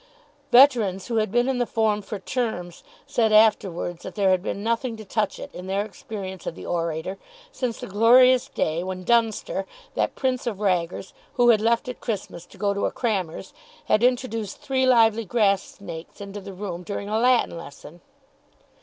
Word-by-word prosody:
Veterans 235 Hz, -8 st, +5 dB
who 230 Hz, -, 0 dB
had 215 Hz, -3 st, +1 dB
been 240 Hz, +2 st, +2 dB
in 265 Hz, -2 st, 0 dB
the 245 Hz, -, 0 dB
form 215 Hz, -2 st, +1 dB
for 210 Hz, +1 st, -6 dB
terms 195 Hz, -5 st, -4 dB, 0.2 s
said 225 Hz, -2 st, +1 dB
afterwards 195 Hz, -5 st, +3 dB
that -, -, -8 dB
there 195 Hz, -3 st, +3 dB
had 185 Hz, -1 st, +2 dB
been 200 Hz, +1 st, -4 dB
nothing 230 Hz, +1 st, -1 dB
to 215 Hz, -, -10 dB
touch 210 Hz, +1 st, -1 dB
it, -, -, -9 dB
in 180 Hz, +1 st, -8 dB
their 195 Hz, +2 st, 0 dB
experience 195 Hz, -3 st, -8 dB
of -, -, -4 dB
the -, -, -9 dB
orator, 170 Hz, +2 st, -3 dB, 0.3 s
since 245 Hz, -3 st, -3 dB
the -, -, -6 dB
glorious 245 Hz, +5 st, +5 dB
day 160 Hz, +2 st, -1 dB
when 185 Hz, 0 st, -5 dB
Dunster, 225 Hz, -3 st, +1 dB, 0.3 s
that -, -, -1 dB
prince 255 Hz, -2 st, -1 dB
of 210 Hz, -5 st, -3 dB
raggers, 180 Hz, -3 st, -1 dB, 0.2 s
who 240 Hz, 0 st, +4 dB
had 220 Hz, -3 st, +5 dB
left 230 Hz, +2 st, +1 dB
at 250 Hz, -, -7 dB
Christmas 190 Hz, -6 st, -5 dB
to -, -, -17 dB
go 200 Hz, 0 st, 0 dB
to 200 Hz, -, 0 dB
a -, -, -4 dB
crammer's, 195 Hz, -9 st, -3 dB, 0.3 s
had 215 Hz, -, +2 dB
introduced 240 Hz, -5 st, 0 dB
three 260 Hz, -1 st, 0 dB
lively 230 Hz, -2 st, +4 dB
grass 200 Hz, -1 st, +2 dB
snakes 170 Hz, -4 st, -10 dB
into 200 Hz, 0 st, -7 dB
the 195 Hz, -, -9 dB
room 180 Hz, -2 st, -5 dB
during 200 Hz, +2 st, -5 dB
a 215 Hz, +1 st, 0 dB
Latin 245 Hz, -5 st, +3 dB
lesson. 170 Hz, +1 st, -11 dB
210 Hz, 185 wpm, -24 LUFS, 185-235 Hz, 0.3 s, Veterans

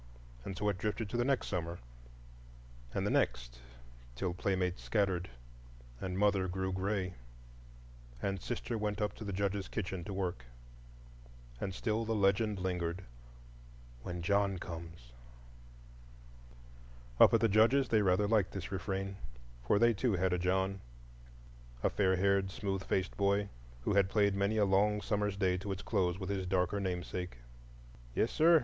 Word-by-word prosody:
And 95 Hz, -, -6 dB
so 105 Hz, -, -1 dB
it 95 Hz, -3 st, -2 dB
drifted 105 Hz, +1 st, -2 dB
to 120 Hz, -, -2 dB
the 120 Hz, -, +2 dB
next 135 Hz, 0 st, +1 dB
summer, 85 Hz, -2 st, -3 dB, 1.1 s
and -, -, -1 dB
the -, -, +1 dB
next,—till -, -, -3 dB
playmates 90 Hz, 0 st, -1 dB
scattered, 95 Hz, -4 st, 0 dB, 0.7 s
and 90 Hz, 0 st, -3 dB
mother 100 Hz, -2 st, +3 dB
grew 95 Hz, +1 st, -2 dB
gray, 95 Hz, 0 st, -1 dB, 1.1 s
and 95 Hz, +5 st, -2 dB
sister 120 Hz, +1 st, -3 dB
went 105 Hz, -1 st, -1 dB
up 105 Hz, -1 st, 0 dB
to -, -, -7 dB
the 100 Hz, -, -4 dB
Judge's 100 Hz, 0 st, -1 dB
kitchen 95 Hz, -4 st, -4 dB
to 100 Hz, -, -5 dB
work. 90 Hz, -10 st, -3 dB, 1.1 s
And 95 Hz, -, -2 dB
still 110 Hz, +4 st, -1 dB
the 115 Hz, 0 st, -1 dB
legend 100 Hz, +1 st, +2 dB
lingered,—"When -, -, -7 dB
John 100 Hz, 0 st, +2 dB
comes." 85 Hz, -7 st, -8 dB, 2.1 s
Up -, -, +9 dB
at 115 Hz, -, +4 dB
the 115 Hz, -, +5 dB
Judge's 115 Hz, +6 st, +4 dB
they 110 Hz, -2 st, +4 dB
rather 100 Hz, +1 st, +3 dB
liked 105 Hz, -3 st, +2 dB
this 95 Hz, -2 st, -5 dB
refrain; 95 Hz, +1 st, -3 dB, 0.5 s
for -, -, +4 dB
they 115 Hz, +2 st, +5 dB
too 115 Hz, +2 st, 0 dB
had 95 Hz, 0 st, +1 dB
a 90 Hz, -, +1 dB
John—a -, -, -4 dB
fair 95 Hz, -2 st, +2 dB
haired, 100 Hz, +1 st, +2 dB
smooth 95 Hz, -2 st, -3 dB
faced 95 Hz, -1 st, -1 dB
boy, 100 Hz, 0 st, +2 dB, 0.3 s
who 105 Hz, -, 0 dB
had 100 Hz, -1 st, +4 dB
played 100 Hz, -1 st, +3 dB
many 100 Hz, +2 st, +1 dB
a 105 Hz, -, +4 dB
long 105 Hz, +2 st, +3 dB
summer's 105 Hz, -2 st, -1 dB
day 95 Hz, -2 st, +2 dB
to 100 Hz, +2 st, -4 dB
its 95 Hz, -, -4 dB
close 95 Hz, -4 st, +1 dB
with 95 Hz, 0 st, -4 dB
his 95 Hz, -2 st, -2 dB
darker 95 Hz, +2 st, +1 dB
namesake. 90 Hz, -4 st, -3 dB, 0.8 s
"Yes, 115 Hz, -, +2 dB
sir! 165 Hz, +1 st, +6 dB
95 Hz, 150 wpm, -33 LUFS, 90-100 Hz, 2.1 s, Up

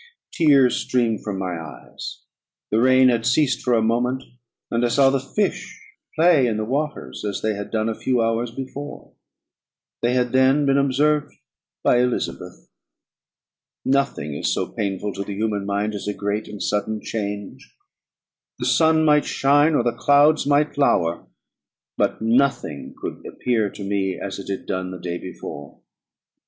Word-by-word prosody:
Tears 140 Hz, -6 st, +4 dB
streamed 115 Hz, -4 st, 0 dB
from 100 Hz, -2 st, -4 dB
my 90 Hz, -3 st, -3 dB
eyes. 80 Hz, -, -9 dB, 0.5 s
The 110 Hz, +2 st, +3 dB
rain 130 Hz, 0 st, +5 dB
had 115 Hz, -2 st, +1 dB
ceased 125 Hz, +3 st, +2 dB
for 125 Hz, -1 st, +2 dB
a 110 Hz, -, +2 dB
moment, 125 Hz, +3 st, 0 dB, 0.5 s
and 115 Hz, +1 st, +1 dB
I -, -, +4 dB
saw 135 Hz, +3 st, +4 dB
the 135 Hz, -, +1 dB
fish 195 Hz, +10 st, -3 dB, 0.4 s
play 160 Hz, -5 st, +4 dB
in 110 Hz, -2 st, -1 dB
the 110 Hz, -, -2 dB
waters 145 Hz, +5 st, -3 dB
as 100 Hz, -2 st, -3 dB
they 110 Hz, 0 st, +1 dB
had 100 Hz, 0 st, -6 dB
done 110 Hz, -1 st, -1 dB
a 115 Hz, -, 0 dB
few 125 Hz, +2 st, -1 dB
hours 115 Hz, +1 st, 0 dB
before; 135 Hz, +4 st, -8 dB, 0.9 s
they 120 Hz, +1 st, +1 dB
had 125 Hz, -1 st, +1 dB
then 130 Hz, +3 st, +4 dB
been 135 Hz, 0 st, +3 dB
observed 145 Hz, +2 st, +1 dB, 0.5 s
by 120 Hz, -, +4 dB
Elizabeth. 125 Hz, -, -3 dB, 1.2 s
Nothing 135 Hz, -, 0 dB
is 70 Hz, -, -1 dB
so -, -, -2 dB
painful 100 Hz, 0 st, -3 dB
to 100 Hz, -, -4 dB
the 100 Hz, 0 st, -6 dB
human 105 Hz, -1 st, -2 dB
mind 100 Hz, +2 st, -1 dB
as 105 Hz, -, -6 dB
a 105 Hz, -, -2 dB
great 105 Hz, +1 st, -2 dB
and 105 Hz, -, -6 dB
sudden 105 Hz, +1 st, -1 dB
change. 105 Hz, +4 st, -5 dB, 0.9 s
The -, -, -4 dB
sun 160 Hz, -1 st, +3 dB
might 150 Hz, -1 st, +4 dB
shine, 145 Hz, +3 st, +3 dB
or 120 Hz, -, +2 dB
the 120 Hz, -, +1 dB
clouds 145 Hz, +4 st, +4 dB
might 145 Hz, 0 st, +2 dB
lower: 85 Hz, -11 st, +1 dB, 0.7 s
but -, -, 0 dB
nothing 115 Hz, -, 0 dB
could -, -, -6 dB
appear 115 Hz, -4 st, 0 dB
to 100 Hz, -, -9 dB
me 95 Hz, -2 st, -1 dB
as 100 Hz, -, -5 dB
it 100 Hz, -, -8 dB
had 95 Hz, -, -4 dB
done 95 Hz, -1 st, -3 dB
the 90 Hz, -, -7 dB
day 85 Hz, 0 st, -4 dB
before. 70 Hz, -5 st, -9 dB
120 Hz, 165 wpm, -22 LUFS, 100-135 Hz, 1.2 s, rain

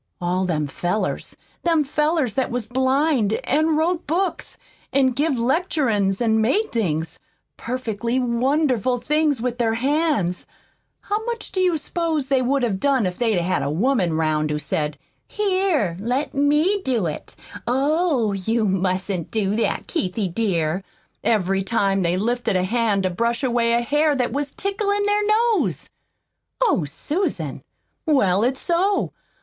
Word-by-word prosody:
All 180 Hz, +1 st, 0 dB
them 155 Hz, -4 st, 0 dB
fellers 175 Hz, +8 st, -3 dB, 0.2 s
them 330 Hz, -3 st, +2 dB
fellers 300 Hz, -3 st, 0 dB
that 265 Hz, -, 0 dB
was 245 Hz, -2 st, -2 dB
blind 260 Hz, -2 st, +1 dB
an' 310 Hz, +3 st, +2 dB
wrote 340 Hz, +2 st, 0 dB
books 350 Hz, +4 st, -2 dB, 0.3 s
an' 265 Hz, -1 st, +3 dB
give 285 Hz, +2 st, 0 dB
lecturin's 235 Hz, -, +1 dB
an' 220 Hz, -2 st, +2 dB
made 405 Hz, -, +1 dB
things 160 Hz, -8 st, -2 dB, 0.4 s
perfectly 235 Hz, -1 st, -3 dB
wonderful 255 Hz, 0 st, +1 dB
things 300 Hz, -1 st, +1 dB
with 245 Hz, 0 st, -2 dB
their 225 Hz, -2 st, +1 dB
hands 265 Hz, -, 0 dB, 0.5 s
how 420 Hz, +2 st, -2 dB
much 470 Hz, -1 st, -4 dB
do 375 Hz, -, -2 dB
you 360 Hz, -3 st, +2 dB
s'pose 310 Hz, -2 st, -2 dB
they 270 Hz, -2 st, +3 dB
would 265 Hz, +1 st, +1 dB
have 205 Hz, -5 st, 0 dB
done 270 Hz, -4 st, +2 dB
if 180 Hz, -1 st, -3 dB
they'd 225 Hz, -5 st, +2 dB
had 180 Hz, +2 st, 0 dB
a -, -, -1 dB
woman 190 Hz, -, +1 dB
'round 155 Hz, -1 st, 0 dB
who 150 Hz, -, -1 dB
said, 150 Hz, 0 st, -2 dB, 0.3 s
'Here, 370 Hz, -, 0 dB
let 250 Hz, +7 st, -1 dB
me 300 Hz, +8 st, +2 dB
do 245 Hz, -, 0 dB
it; 155 Hz, -2 st, -5 dB, 0.3 s
oh, 275 Hz, -, +1 dB
you 220 Hz, +4 st, 0 dB
mustn't 185 Hz, -2 st, -1 dB
do 210 Hz, -2 st, 0 dB
that, 230 Hz, -, -1 dB
Keithie, 195 Hz, -, -2 dB
dear!' 180 Hz, -5 st, 0 dB, 0.4 s
every 195 Hz, -3 st, +1 dB
time 195 Hz, -2 st, +1 dB
they 175 Hz, 0 st, +1 dB
lifted 235 Hz, +1 st, 0 dB
a 180 Hz, -, +2 dB
hand 215 Hz, -1 st, +1 dB
to 185 Hz, -, 0 dB
brush 235 Hz, +7 st, -1 dB
away 235 Hz, -2 st, +2 dB
a 235 Hz, -, +3 dB
hair 295 Hz, +4 st, +2 dB
that 250 Hz, -2 st, -1 dB
was 285 Hz, 0 st, -2 dB
ticklin' 405 Hz, +1 st, -1 dB
their 415 Hz, 0 st, +2 dB
nose?" 445 Hz, +1 st, +1 dB, 0.7 s
"Oh, 425 Hz, -, +2 dB
Susan!" 305 Hz, -, -3 dB, 0.5 s
"Well, 200 Hz, -, +3 dB
it's 260 Hz, +2 st, 0 dB
so. 380 Hz, +4 st, +1 dB
245 Hz, 150 wpm, -22 LUFS, 195-305 Hz, 0.7 s, an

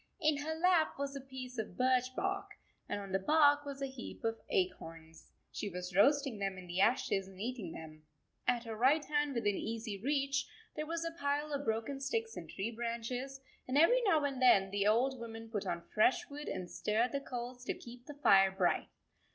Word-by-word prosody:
In 310 Hz, -3 st, +3 dB
her 310 Hz, +3 st, -3 dB
lap 335 Hz, -1 st, +3 dB
was 280 Hz, 0 st, -3 dB
a 275 Hz, -, -5 dB
piece 255 Hz, -2 st, -8 dB
of 210 Hz, -5 st, -5 dB
birch 255 Hz, 0 st, +2 dB
bark, 395 Hz, +1 st, -2 dB, 0.3 s
and -, -, -2 dB
on 200 Hz, -1 st, -7 dB
the 195 Hz, -, +2 dB
bark 290 Hz, +5 st, +4 dB
was 275 Hz, -1 st, -5 dB
a -, -, +2 dB
heap 265 Hz, -3 st, -8 dB
of 225 Hz, 0 st, -1 dB
acorns. 165 Hz, -, -3 dB, 0.2 s
She 205 Hz, -, -4 dB
was 180 Hz, -1 st, -6 dB
roasting 275 Hz, +1 st, +4 dB
them 195 Hz, -1 st, -2 dB
in 185 Hz, -, -9 dB
the 175 Hz, +2 st, -1 dB
ashes 195 Hz, -4 st, +2 dB
and 190 Hz, -1 st, -14 dB
eating 225 Hz, -5 st, -4 dB
them. 155 Hz, -1 st, -10 dB, 0.5 s
At 245 Hz, -1 st, +2 dB
her 225 Hz, -2 st, -5 dB
right 275 Hz, +7 st, +3 dB
hand, 295 Hz, -1 st, 0 dB
within 205 Hz, -4 st, +1 dB
easy 220 Hz, -3 st, -4 dB
reach, 275 Hz, 0 st, +1 dB, 0.3 s
there 305 Hz, 0 st, -3 dB
was 335 Hz, +1 st, -2 dB
a 330 Hz, -, -2 dB
pile 295 Hz, -2 st, -1 dB
of 285 Hz, 0 st, -2 dB
broken 225 Hz, +5 st, -1 dB
sticks 225 Hz, -5 st, -2 dB
and 170 Hz, -3 st, -8 dB
tree 200 Hz, +4 st, -3 dB
branches, 240 Hz, +3 st, -4 dB, 0.3 s
and 255 Hz, +2 st, 0 dB
every 485 Hz, +12 st, +6 dB
now 330 Hz, -10 st, +3 dB
and 275 Hz, -2 st, -2 dB
then 195 Hz, -6 st, +5 dB
the 200 Hz, 0 st, +1 dB
old 250 Hz, +4 st, +2 dB
woman 225 Hz, -1 st, -8 dB
put 205 Hz, -3 st, -2 dB
on 170 Hz, -1 st, -3 dB
fresh 220 Hz, +4 st, +3 dB
wood 295 Hz, +1 st, -7 dB
and 185 Hz, -2 st, -5 dB
stirred 225 Hz, +4 st, +1 dB
the 280 Hz, -, -2 dB
coals 245 Hz, -1 st, -6 dB
to -, -, -1 dB
keep 245 Hz, +1 st, -12 dB
the 295 Hz, -, -8 dB
fire 195 Hz, -9 st, +6 dB
bright. 190 Hz, -2 st, 0 dB
250 Hz, 205 wpm, -34 LUFS, 205-285 Hz, 0.5 s, every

